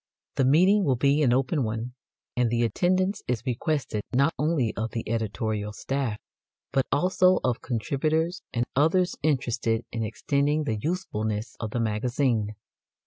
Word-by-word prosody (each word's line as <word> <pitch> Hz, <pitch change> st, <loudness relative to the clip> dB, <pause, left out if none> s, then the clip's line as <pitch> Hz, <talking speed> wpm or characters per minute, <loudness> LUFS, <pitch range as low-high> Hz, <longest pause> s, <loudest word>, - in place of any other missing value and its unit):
The 135 Hz, -, +3 dB
meeting 185 Hz, +9 st, +5 dB
will 135 Hz, -7 st, +2 dB
be 140 Hz, +4 st, +3 dB
an 130 Hz, -5 st, +4 dB
open 135 Hz, +3 st, +1 dB
one, 115 Hz, +2 st, -3 dB, 0.4 s
and 125 Hz, -1 st, +2 dB
the 120 Hz, +1 st, +1 dB
attendance 185 Hz, -, +1 dB
is 120 Hz, -3 st, -1 dB
requested 130 Hz, -3 st, -1 dB
not 140 Hz, +6 st, +3 dB
only 150 Hz, -7 st, +1 dB
of 110 Hz, 0 st, -2 dB
the 115 Hz, -, -4 dB
editorial 110 Hz, -1 st, -2 dB
staff, 130 Hz, -2 st, -2 dB, 0.5 s
but 135 Hz, -1 st, +1 dB
also 185 Hz, +4 st, +3 dB
of 125 Hz, -2 st, 0 dB
contributors 155 Hz, -, -1 dB
and 120 Hz, 0 st, 0 dB
others 170 Hz, +6 st, +3 dB
interested 120 Hz, -6 st, 0 dB
in 115 Hz, -, -3 dB
extending 140 Hz, +7 st, 0 dB
the 115 Hz, -7 st, -1 dB
usefulness 110 Hz, -, -2 dB
of 110 Hz, -, -3 dB
the 120 Hz, -, -2 dB
Magazine. 115 Hz, 0 st, 0 dB
125 Hz, 145 wpm, -26 LUFS, 115-155 Hz, 0.5 s, meeting